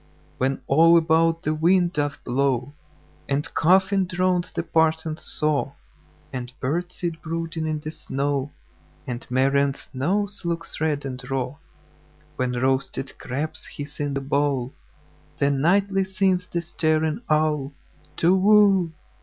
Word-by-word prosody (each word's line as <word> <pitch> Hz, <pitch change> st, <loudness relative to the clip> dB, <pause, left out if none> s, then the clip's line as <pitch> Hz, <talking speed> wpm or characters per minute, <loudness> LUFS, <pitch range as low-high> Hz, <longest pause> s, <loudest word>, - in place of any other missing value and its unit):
When 135 Hz, +1 st, 0 dB
all 165 Hz, +4 st, +6 dB
about 165 Hz, +1 st, +2 dB
the 155 Hz, -, 0 dB
wind 175 Hz, +3 st, +3 dB
doth 145 Hz, -1 st, -2 dB
blow, 130 Hz, +1 st, 0 dB, 0.6 s
And 145 Hz, +3 st, -1 dB
coughing 190 Hz, +2 st, +3 dB
drowns 180 Hz, 0 st, 0 dB
the -, -, -3 dB
parson's 160 Hz, 0 st, +1 dB
saw, 150 Hz, -2 st, 0 dB, 0.6 s
And 125 Hz, -1 st, -5 dB
birds 175 Hz, +7 st, -2 dB
sit 170 Hz, -2 st, -4 dB
brooding 165 Hz, 0 st, -3 dB
in 155 Hz, -1 st, -2 dB
the 155 Hz, -, -5 dB
snow, 140 Hz, -2 st, -2 dB, 0.5 s
And 125 Hz, 0 st, -5 dB
Marian's 135 Hz, +2 st, +1 dB
nose 195 Hz, +10 st, -1 dB
looks 170 Hz, -1 st, -4 dB
red 150 Hz, -2 st, 0 dB
and 130 Hz, -2 st, -5 dB
raw; 135 Hz, +1 st, -2 dB, 0.8 s
When 125 Hz, -3 st, -1 dB
roasted 130 Hz, +2 st, -1 dB
crabs 155 Hz, +5 st, -4 dB
hiss 145 Hz, 0 st, -8 dB
in 145 Hz, -1 st, -1 dB
the 140 Hz, -, -1 dB
bowl—Then 140 Hz, 0 st, -2 dB
nightly 195 Hz, +4 st, +3 dB
sings 190 Hz, -1 st, 0 dB
the 170 Hz, -1 st, -3 dB
staring 155 Hz, +2 st, 0 dB
owlTu 150 Hz, -2 st, -2 dB, 0.2 s
whoo! 195 Hz, -4 st, +5 dB
155 Hz, 125 wpm, -24 LUFS, 140-170 Hz, 0.8 s, all